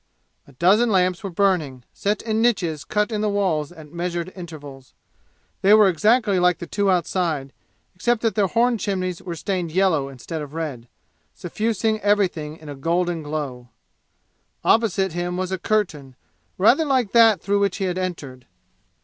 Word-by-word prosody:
A -, -, -16 dB
dozen 195 Hz, -, +3 dB
lamps 185 Hz, -3 st, +2 dB
were 195 Hz, -, -3 dB
burning, 165 Hz, -9 st, 0 dB
set 205 Hz, +1 st, -2 dB
in 220 Hz, -1 st, 0 dB
niches 175 Hz, -11 st, 0 dB
cut 210 Hz, +2 st, -1 dB
in 210 Hz, -1 st, -1 dB
the 215 Hz, -, +1 dB
walls 180 Hz, -7 st, 0 dB
at 155 Hz, -3 st, -14 dB
measured 175 Hz, +1 st, -3 dB
intervals. 145 Hz, -7 st, -10 dB, 0.7 s
They 200 Hz, +2 st, +6 dB
were 215 Hz, -2 st, +6 dB
exactly 210 Hz, +2 st, +2 dB
like 180 Hz, -1 st, +3 dB
the -, -, -7 dB
two 200 Hz, +2 st, 0 dB
outside, 170 Hz, -6 st, -1 dB, 0.4 s
except 235 Hz, +5 st, 0 dB
that 225 Hz, -, +1 dB
their 205 Hz, -3 st, +2 dB
horn 235 Hz, +3 st, +1 dB
chimneys 185 Hz, -4 st, -2 dB
were 175 Hz, -2 st, -6 dB
stained 175 Hz, 0 st, -3 dB
yellow 165 Hz, -6 st, +1 dB
instead 140 Hz, +5 st, -7 dB
of 150 Hz, +1 st, -8 dB
red, 140 Hz, -8 st, -5 dB, 0.5 s
suffusing 220 Hz, +4 st, -1 dB
everything 185 Hz, -7 st, 0 dB
in 155 Hz, -, -14 dB
a 145 Hz, -, -6 dB
golden 170 Hz, +4 st, -1 dB
glow. 145 Hz, -5 st, -5 dB, 0.9 s
Opposite 195 Hz, -4 st, +2 dB
him 175 Hz, +1 st, -3 dB
was 185 Hz, 0 st, -3 dB
a 190 Hz, -, -2 dB
curtain, 160 Hz, -, -1 dB, 0.4 s
rather 240 Hz, -, +4 dB
like 260 Hz, -8 st, +1 dB
that 225 Hz, -4 st, +6 dB
through 200 Hz, +3 st, 0 dB
which 200 Hz, -2 st, 0 dB
he 195 Hz, -, -2 dB
had 185 Hz, 0 st, -2 dB
entered. 140 Hz, -9 st, -6 dB
180 Hz, 165 wpm, -22 LUFS, 155-205 Hz, 0.9 s, They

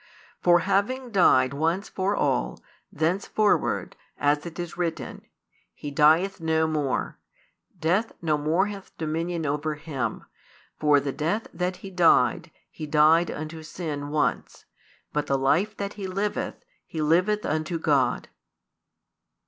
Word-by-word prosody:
For 175 Hz, -1 st, +5 dB
having 210 Hz, +7 st, 0 dB
died 130 Hz, -10 st, +4 dB
once 165 Hz, +7 st, 0 dB
for 195 Hz, +2 st, -1 dB
all, -, -, 0 dB, 0.3 s
thenceforward, 190 Hz, +6 st, 0 dB, 0.2 s
as 145 Hz, +3 st, +1 dB
it 170 Hz, -, -9 dB
is 175 Hz, -1 st, -5 dB
written, 170 Hz, -2 st, -3 dB, 0.5 s
He 145 Hz, -, -7 dB
dieth 165 Hz, +6 st, +3 dB
no 160 Hz, 0 st, +2 dB
more; 150 Hz, -4 st, -2 dB, 0.6 s
death 185 Hz, +8 st, +1 dB
no 160 Hz, -3 st, +1 dB
more 155 Hz, +6 st, +1 dB
hath 200 Hz, -2 st, -9 dB
dominion 165 Hz, +1 st, -2 dB
over 150 Hz, +2 st, -1 dB
Him. 135 Hz, -7 st, -4 dB, 0.5 s
For 150 Hz, -1 st, +4 dB
the 140 Hz, 0 st, -3 dB
death 165 Hz, +11 st, -1 dB
that 180 Hz, +1 st, -2 dB
He 195 Hz, -, -7 dB
died, 170 Hz, -2 st, +3 dB, 0.2 s
He 155 Hz, -, -7 dB
died 155 Hz, +3 st, +4 dB
unto 155 Hz, +1 st, -6 dB
sin 155 Hz, -3 st, -5 dB
once: 150 Hz, 0 st, -1 dB, 0.5 s
but 150 Hz, -1 st, -1 dB
the 135 Hz, -, +2 dB
life 170 Hz, +11 st, +1 dB
that 200 Hz, 0 st, -4 dB
He 200 Hz, -2 st, -6 dB
liveth, 200 Hz, +3 st, -2 dB, 0.3 s
He 160 Hz, -, -6 dB
liveth 180 Hz, +7 st, +2 dB
unto 155 Hz, +3 st, -1 dB
God. 140 Hz, -6 st, +1 dB
160 Hz, 130 wpm, -26 LUFS, 150-185 Hz, 0.6 s, For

